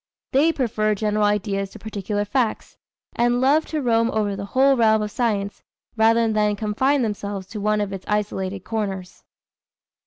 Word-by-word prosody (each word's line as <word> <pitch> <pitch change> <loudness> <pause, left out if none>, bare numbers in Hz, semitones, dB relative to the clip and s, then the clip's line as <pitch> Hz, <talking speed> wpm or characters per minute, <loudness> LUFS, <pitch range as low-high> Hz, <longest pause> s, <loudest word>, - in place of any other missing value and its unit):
They 295 +5 +4
prefer 215 -7 0
general 210 0 +1
ideas 200 -1 0
to 220 - -12
particular 205 -1 -3
facts, 230 +1 -1 0.4
and 240 +1 +2
love 285 +5 +3
to 305 -3 -3
roam 230 -1 +2
over 210 -3 -1
the 200 0 -5
whole 265 +5 +3
realm 220 -3 +3
of 210 - -4
science 205 -4 -1 0.3
rather 225 +1 +4
than 210 -1 +2
confine 245 +7 +1
themselves 205 -3 -4
to 215 -2 -6
one 210 +1 +1
of 205 -1 -2
its 190 -1 -7
isolated 200 -2 -2
corners. 195 -4 -4
215 Hz, 160 wpm, -22 LUFS, 205-235 Hz, 0.4 s, They